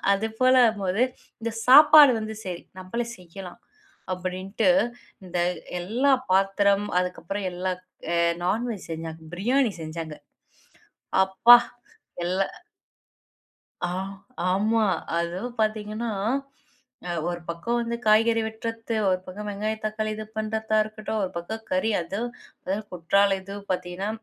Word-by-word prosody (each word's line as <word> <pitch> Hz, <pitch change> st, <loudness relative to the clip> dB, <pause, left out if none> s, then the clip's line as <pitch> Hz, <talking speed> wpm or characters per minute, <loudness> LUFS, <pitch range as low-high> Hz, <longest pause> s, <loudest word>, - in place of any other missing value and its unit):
அது 200 Hz, +3 st, +1 dB
போல 255 Hz, 0 st, +5 dB
ஆகும் 215 Hz, -3 st, -3 dB
போது. 190 Hz, +6 st, +1 dB, 0.4 s
இந்த 230 Hz, -, -2 dB, 0.2 s
சாப்பாடு 295 Hz, 0 st, +9 dB
வந்து 220 Hz, 0 st, -5 dB
சரி 180 Hz, -2 st, -5 dB, 0.2 s
நம்மளே 210 Hz, +6 st, -3 dB
செய்யலாம் 180 Hz, +2 st, -10 dB, 0.5 s
அப்டின்ட்டு 185 Hz, +5 st, -1 dB, 0.6 s
இந்த 180 Hz, -1 st, -4 dB, 0.4 s
எல்லா 245 Hz, +10 st, +2 dB, 0.2 s
பாத்திரம் 195 Hz, +1 st, +3 dB
அதுக்கப்புறம் 180 Hz, +2 st, -4 dB
எல்லாம் 180 Hz, 0 st, -3 dB, 0.3 s
ஆ -, -, +2 dB, 0.3 s
நான் 220 Hz, +7 st, 0 dB
வெஜ் 205 Hz, -6 st, -7 dB
செஞ்சாங்க. 160 Hz, 0 st, -6 dB
பிரியாணி 245 Hz, +6 st, +2 dB
செஞ்சாங்க. 155 Hz, -1 st, -6 dB, 1.1 s
அப்பா! 210 Hz, +6 st, +8 dB, 0.7 s
எல்லாம் 185 Hz, +2 st, -1 dB, 1.3 s
ஆ -, -, +1 dB, 0.6 s
ஆமா. 215 Hz, +4 st, +2 dB, 0.3 s
அதுவும் 185 Hz, +9 st, -3 dB
பார்த்தீங்கன்னா, 215 Hz, +1 st, -1 dB, 1.0 s
அ -, -, -2 dB, 0.2 s
ஒருபக்கம் 175 Hz, +6 st, -3 dB
வந்து 235 Hz, 0 st, -2 dB
காய்கறி 225 Hz, +1 st, +4 dB
வெட்றது. 225 Hz, +1 st, -5 dB
1 185 Hz, -1 st, +2 dB
பக்கம் 205 Hz, +3 st, -7 dB
வெங்காயம், 215 Hz, +2 st, -3 dB
தக்காளி 215 Hz, 0 st, -2 dB
இது 215 Hz, 0 st, -6 dB
பண்றதா 220 Hz, 0 st, -1 dB
இருக்கட்டும். 215 Hz, 0 st, -4 dB
1 185 Hz, -, -4 dB
பக்கம் 220 Hz, +6 st, -5 dB
கறி, 185 Hz, +5 st, +1 dB
அதுவும் 220 Hz, +8 st, -4 dB, 0.3 s
அது 190 Hz, +2 st, 0 dB, 0.2 s
குற்றாலம் 195 Hz, +3 st, +2 dB
இதுவும் 200 Hz, +1 st, -9 dB
பார்த்தீங்கன்னா 180 Hz, +2 st, -3 dB
200 Hz, 120 wpm, -25 LUFS, 185-225 Hz, 1.3 s, சாப்பாடு